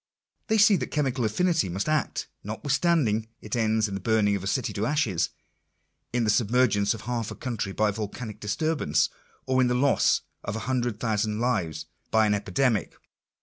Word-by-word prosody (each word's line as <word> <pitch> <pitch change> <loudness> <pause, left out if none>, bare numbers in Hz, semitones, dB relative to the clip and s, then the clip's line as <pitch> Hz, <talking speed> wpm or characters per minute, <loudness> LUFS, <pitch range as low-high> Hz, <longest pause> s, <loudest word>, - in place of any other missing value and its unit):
They 220 - +2
see 210 -1 +6
that 125 - -3
chemical 130 -5 0
affinity 165 - +1
must 95 - -2
act, 155 -1 0 0.2
notwithstanding 130 - +1
it 105 - -5
ends 110 -1 +2
in 100 - -6
the 95 - -3
burning 105 0 +2
of 95 - -4
a - - -3
city 120 0 -1
to 105 +3 -1
ashes 120 - +1 0.4
— - - -49
in 120 -1 +1
the 105 - +3
submergence 110 -2 +2
of 110 - -9
half 120 -2 -3
a - - -7
country 115 -6 -3
by 105 +2 +1
volcanic 110 +2 -6
disturbance 105 - 0 0.2
— - - -34
or 130 0 +2
in 125 - +4
the 125 - +1
loss 140 +3 +3 0.2
of 100 - -4
a - - -2
hundred 120 -4 -1
thousand 110 -1 0
lives 95 -11 -1 0.2
by 110 0 +4
an 105 - +2
epidemic. 105 +3 0
110 Hz, 190 wpm, -26 LUFS, 105-130 Hz, 0.4 s, see